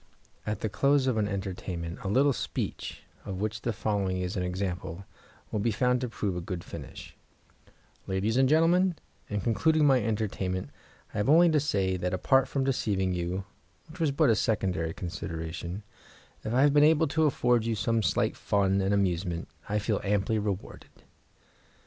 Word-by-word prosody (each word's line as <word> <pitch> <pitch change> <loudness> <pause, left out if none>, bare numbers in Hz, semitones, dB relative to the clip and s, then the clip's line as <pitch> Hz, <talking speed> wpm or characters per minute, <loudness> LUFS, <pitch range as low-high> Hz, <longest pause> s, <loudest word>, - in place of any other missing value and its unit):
At 105 -2 -2
the - - 0
close 140 +6 +2
of 130 -4 +1
an 105 -1 +1
entertainment 95 -4 -4
a - - -5
little 135 +8 +3
speech, - - -4 0.2
of 95 -2 -5
which 110 +1 -2
the 120 - -1
following 100 -4 -1
is 90 +3 -3
an 90 - -1
example, 90 0 -3 0.5
will 105 - -1
be 110 +3 +1
found 125 +3 +1
to 125 - -2
prove 100 -4 -2
a 90 - -3
good 90 -1 -5
finish: - - -9 0.9
"Ladies 95 +4 0
and 130 0 +4
gentlemen, 170 +4 +4 0.3
in 105 -1 -2
concluding 155 - +2
my 135 -3 +5
entertainment 95 -6 -2 0.4
I - - -5
have 105 - +1
only 170 +2 +6
to 155 - +4
say 95 -9 0
that, 90 +1 -1
apart 135 +7 +3
from 135 - -1
deceiving 100 -8 0
you, 90 +2 -2 0.5
which 165 +3 -12
was 160 -2 +2
but 140 -2 +3
a - - +4
secondary 95 -8 0
consideration, 85 +2 -5 0.6
if 110 - -3
I 125 +3 +3
have 145 -1 +4
been 145 0 +6
able 160 +1 +5
to 160 +2 +2
afford 125 -5 +2
you 115 0 -1
some 110 +3 +1
slight - - +1
fun 100 -1 +1
and 95 +1 +2
amusement 90 -3 -1 0.2
I 105 - +1
feel 105 0 0
amply 105 +2 +1
rewarded." 100 -2 -6
105 Hz, 175 wpm, -28 LUFS, 95-130 Hz, 0.9 s, only